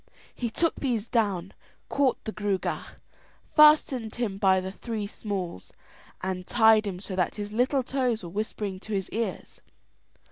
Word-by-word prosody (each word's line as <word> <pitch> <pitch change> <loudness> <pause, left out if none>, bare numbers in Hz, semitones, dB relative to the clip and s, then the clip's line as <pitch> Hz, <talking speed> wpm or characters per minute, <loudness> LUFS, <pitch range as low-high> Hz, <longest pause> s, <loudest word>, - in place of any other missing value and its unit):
He 240 - -3
took 330 +8 0
these 235 -5 -1
down, 200 -7 0 0.3
caught 275 -3 +1
the 220 - -4
Gruagach, 205 -3 -2 0.6
fastened 300 -7 +5
him 215 -5 -2
by 190 -2 +4
the 190 0 -4
three 220 +1 -4
smalls, 195 - -5 0.5
and 185 -1 -3
tied 220 -2 +5
him 185 -2 -4
so 190 -1 -6
that 180 -2 0
his 205 -1 -5
little 255 +4 +2
toes 250 -5 -1
were 170 - -6
whispering 205 -1 -3
to 215 +2 -7
his 195 -2 -2
ears. 230 +1 -4
215 Hz, 150 wpm, -27 LUFS, 190-240 Hz, 0.6 s, fastened